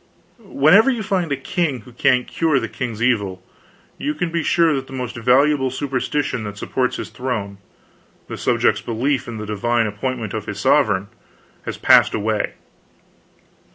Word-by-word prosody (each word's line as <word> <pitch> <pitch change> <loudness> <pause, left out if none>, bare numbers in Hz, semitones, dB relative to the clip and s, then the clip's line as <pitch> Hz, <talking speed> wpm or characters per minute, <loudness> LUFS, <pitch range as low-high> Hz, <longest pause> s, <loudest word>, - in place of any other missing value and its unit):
Wherever 200 - +4
you 240 -5 -1
find 185 -6 -1
a 140 - 0
king 140 - -2
who 125 - -15
can't 125 +1 +2
cure 160 -4 +1
the - - -3
king's 120 -4 -4
evil 100 -7 0 0.6
you 150 - -2
can 165 +2 -2
be 170 0 0
sure 165 0 +3
that 135 -1 -3
the - - -11
most 125 -2 -5
valuable 130 +3 +3
superstition 135 -1 -2
that 105 0 -7
supports 125 +4 -1
his - - -6
throne 105 -6 -4 0.7
the - - -6
subject's - - +1
belief 130 +4 -1
in 120 -2 -6
the 105 - -5
divine 115 +3 0
appointment 110 +1 -3
of 110 -2 -5
his 105 -1 -5
sovereign 105 -6 +2 0.6
has - - -4
passed - - +5
away. 110 0 -1
125 Hz, 160 wpm, -20 LUFS, 110-150 Hz, 0.7 s, passed